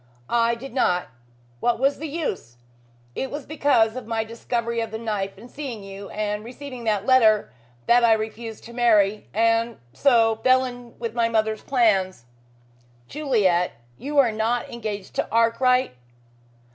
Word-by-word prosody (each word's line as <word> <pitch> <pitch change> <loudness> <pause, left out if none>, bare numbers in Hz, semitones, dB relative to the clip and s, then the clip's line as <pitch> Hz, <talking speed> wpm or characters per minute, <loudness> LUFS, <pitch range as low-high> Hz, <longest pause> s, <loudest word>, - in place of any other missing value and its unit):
"I 230 0 +2
did 255 +2 -10
not. 180 -9 +1 0.5
What 240 - +1
was 275 +4 +1
the 315 - -4
use? 280 - -4 0.6
It 265 - -3
was 290 -1 -6
because 275 -7 +2
of 255 -4 -7
my 225 -1 -1
discovery 235 +1 -3
of 225 - -3
the 220 - -5
knife 210 -4 -3
and 225 +5 -12
seeing 250 -6 -7
you, 195 0 -9
and 210 0 -3
receiving 255 0 -9
that 210 -2 0
letter, 220 - +4 0.3
that 240 0 +4
I 230 -1 +6
refused 220 0 -4
to 235 - -11
marry, 215 -4 +3
and 230 +1 +1 0.2
so 230 -5 +3
fell 260 +3 +3
in 245 -1 -9
with 230 -1 -4
my 230 -1 +1
mother's 220 -1 0
plans." 195 - +1 0.8
"Juliet, 205 - +1 0.3
you 290 +2 -4
are 260 -5 +5
not 225 +3 -1
engaged 210 -4 -6
to - - 0
Arkwright?" 240 - +2
230 Hz, 155 wpm, -24 LUFS, 215-250 Hz, 0.8 s, I